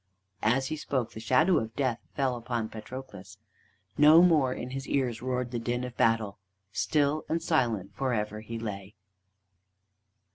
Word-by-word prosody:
As 130 +5 +2
he 155 - -3
spoke, 130 -5 -2
the - - -8
shadow 160 - +3
of 110 0 -6
Death 130 -5 0 0.2
fell 135 -3 +1
upon 120 -2 -3
Patroclus. 105 -4 -9 0.6
No 155 +3 +8
more 155 -7 +4
in 125 0 -5
his 135 +1 -5
ears 125 -5 0
roared 125 -1 -2
the 120 - -2
din 120 +2 -2
of 125 -1 -6
battle; 110 -3 +1 0.3
still 150 +5 +1
and 165 - +1
silent 120 - 0
for 130 +6 -1
ever 105 -2 -2
he 115 +1 -6
lay. 105 -2 -6
125 Hz, 155 wpm, -29 LUFS, 110-135 Hz, 0.6 s, No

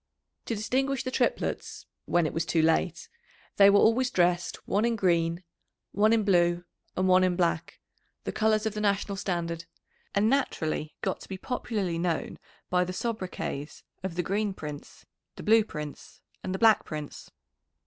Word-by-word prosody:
To 230 - -2
distinguish 260 +5 0
the 255 - -3
triplets - - -1 0.2
(when 175 -1 +2
it 155 - -2
was 165 - 0
too 165 -1 +1
late) 165 +1 +1 0.5
they 200 0 +8
were 200 - +6
always 235 +5 +4
dressed 175 -2 0
one 205 +2 +1
in 235 0 +2
green, 170 -3 +1 0.5
one 215 +2 +3
in 225 -1 +3
blue, 175 -3 +3 0.3
and 185 0 +2
one 185 0 +5
in 180 -1 +2
black, 170 -2 -1 0.4
the - - -3
colours 215 0 +1
of 220 - -1
the 210 - -3
national 200 -1 0
standard, 170 -4 -3 0.5
and 200 +2 +3
naturally 160 - -1
got 190 - -1
to - - -12
be 190 - -4
popularly 200 -7 -2
known 170 -2 -2 0.3
by 180 0 +3
the 180 +1 -4
sobriquets 185 -9 -4 0.2
of 190 -3 -4
the 180 - 0
Green 200 +2 -1
Prince, 150 -3 -9 0.3
the - - -9
Blue 220 0 +5
Prince, 150 -7 -8 0.2
and 185 - -2
the - - -1
Black 220 +1 +5
Prince. 150 -2 -7
185 Hz, 170 wpm, -28 LUFS, 170-215 Hz, 0.5 s, they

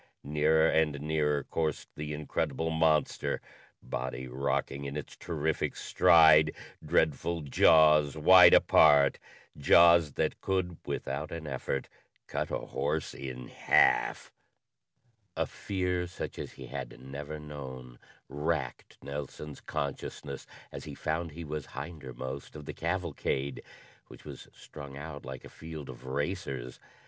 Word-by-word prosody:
Nearer 75 +2 +3
and 80 -3 +2
nearer 75 -1 0
coursed 80 -3 -2
the 75 0 -5
incredible 75 +1 -2
monster, 80 -1 +1 0.4
body 65 0 -4
rocking 70 +2 -2
in 70 +1 -4
its 75 - -7
terrific 80 -2 -2
stride, 80 -2 +5 0.3
dreadful 85 +3 +1
jaws 75 0 +5
wide 90 +3 +8
apart 70 -3 +5 0.4
jaws 85 +1 +6
that - - -1
could, 95 -3 -1
without 70 +3 -3
an 85 -1 -6
effort, 70 -1 -3 0.4
cut - - -3
a - - -1
horse - - -3
in 65 -2 -7
half. - - +2 1.1
A - - +1
fear 90 -2 -2
such 90 - -7
as - - -6
he - - -10
had 65 - -7
never 70 +4 -7
known 65 -5 -9 0.3
racked 75 -2 -3
Nelson's 70 +1 -7
consciousness 70 0 -5 0.2
as - - -8
he - - -8
found 80 +2 -2
he 85 +3 -8
was 75 -2 -5
hindermost 70 -3 -7
of 75 -1 -9
the - - -6
cavalcade, 85 -6 -2 0.5
which - - -14
was - - -9
strung 70 -2 -11
out 70 -1 -8
like 65 -1 -8
a - - -8
field 80 -3 -9
of 65 0 -10
racers. 70 -4 -3
75 Hz, 125 wpm, -30 LUFS, 70-80 Hz, 1.1 s, wide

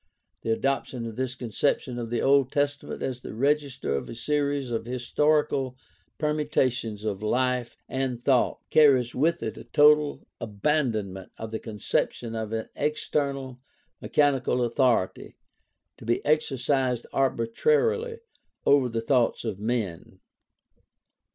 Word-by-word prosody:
The - - -4
adoption 125 0 -1
of 115 -1 -6
this 130 +1 -2
conception 125 +1 -1
of 115 -1 -4
the 120 0 -1
Old 135 -1 +4
Testament 145 0 -1
as 125 -2 -3
the - - -8
register 140 - 0
of 70 - -4
a - - -7
series 140 +1 -1
of 115 -1 -2
historical 130 +1 +1 0.4
permutations 130 -8 0
of 105 -2 -2
life 125 +2 0
and 130 -2 -2
thought 125 0 +2
carries 130 -6 +5
with 165 +5 +1
it - - -4
a - - -9
total 150 0 +4
abandoment 105 -5 -1
of 110 0 -6
the 110 - -3
conception 115 +1 -2
of 110 -1 -4
an 110 0 -3
external, 140 -3 -2 0.4
mechanical 135 -4 +2
authority 120 -5 +1 0.6
to - - -11
be 120 - 0
exercised 135 -4 +1
arbitrarily 460 - +1 0.4
over 140 -3 +4
the 115 -1 -2
thoughts 120 -1 +1
of 105 -4 -3
men. 110 -6 -3
130 Hz, 125 wpm, -26 LUFS, 115-145 Hz, 0.6 s, carries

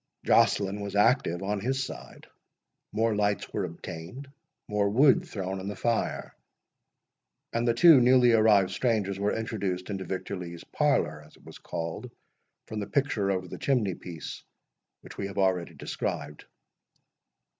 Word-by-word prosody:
Joceline 100 0 +3
was 100 0 -5
active 100 -5 +2
on 100 +1 -1
his 130 +5 -1
side—more 115 -3 -6
lights 105 -1 -1
were 100 - -1
obtained—more 105 - -5
wood 130 +5 +4
thrown 95 -1 -4
on 95 - -6
the 105 - -4
fire—and 115 +1 -5
the 115 - +2
two 160 -1 +8
newly 125 0 +5
arrived 105 -4 +4
strangers 105 -6 0
were 100 +1 0
introduced 100 -4 -3
into 95 -1 -3
Victor 95 +2 -4
Lee's 85 -2 -8
parlour, 75 0 0
as 75 +1 -18
it - - -23
was - - -12
called, 85 +9 -5 0.6
from 110 - -5
the 100 - -4
picture 115 -7 0
over 95 -1 -1
the - - -8
chimney 120 -9 +1
piece, 85 -2 -8 0.6
which - - -12
we 100 - -2
have 100 - -9
already 95 -3 +1
described. 75 - -5
100 Hz, 140 wpm, -28 LUFS, 95-115 Hz, 0.6 s, two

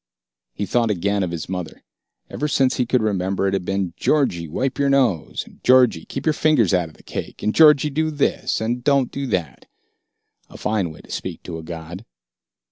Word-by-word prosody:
He 100 - -2
thought 115 +2 +1
again 100 +1 0
of 90 - -1
his 85 -2 -5
mother. 90 -3 -6 0.4
Ever 150 - -3
since 135 -3 +2
he 125 - 0
could 125 -1 +2
remember, 95 -2 0
it 95 - 0
had 95 -2 -1
been, 95 -3 -2
"Georgie, 105 - +1
wipe 130 - -2
your 140 0 +2
nose!" 125 - +1
and, - - -19
"Georgie, 125 -10 +4
keep - - -6
your 155 - +3
fingers 150 - +3
out 90 -3 +1
of 80 - -19
the - - -20
cake!" - - -7
and 105 - +1
Georgie 150 -2 +6
do 155 +3 0
this 150 -2 0
and 120 +2 -2
don't 140 -3 +2
do 140 0 -4
that. 85 - -3 0.8
A - - -12
fine 105 -5 -1
way 75 - -13
to - - -15
speak - - -5
to 80 -2 -6
a - - -9
god. 85 +4 -8
105 Hz, 205 wpm, -21 LUFS, 90-135 Hz, 0.8 s, Georgie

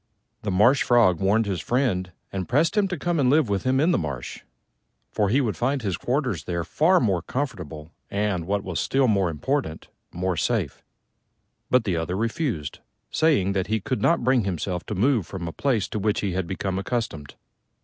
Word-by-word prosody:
The 105 - -3
Marsh 105 +9 +4
Frog 110 -9 +4
warned 105 +4 +2
his 95 -5 -2
friend 110 -8 0 0.2
and 95 -2 -4
pressed 150 - +2
him 205 -2 +3
to 180 -2 -3
come 170 +2 -1
and 130 -3 +3
live 145 -4 +3
with 100 +1 -1
him 130 +1 +2
in 160 +5 +3
the - - +2
marsh, 70 -6 -5 0.7
for 105 -2 +1
he 130 +7 +3
would 115 -6 -1
find 135 +1 -1
his 95 -4 -1
quarters 125 - -1
there 85 -1 -2
far 165 - +3
more 95 -7 +1
comfortable 85 - -5 0.2
and 100 -4 -1
what 100 0 0
was 90 -3 -3
still 135 -1 +2
more 100 -5 +2
important 85 - -2 0.2
more 90 +1 -1
safe. - - -1 0.9
But 125 -2 +4
the 90 -6 -1
other 80 +2 -2
refused, 115 - -2 0.3
saying 140 - +2
that 95 -2 -1
he 110 +1 0
could 130 +5 -3
not 170 - +2
bring 130 -1 +3
himself 90 -1 -3
to 105 - -3
move 115 - +2
from 90 -3 -5
a - - -4
place 125 -8 0
to 105 - -3
which 105 +1 0
he 100 - -1
had 90 -1 -2
become 95 +1 -2
accustomed. 100 - -4
105 Hz, 195 wpm, -24 LUFS, 90-130 Hz, 0.9 s, Marsh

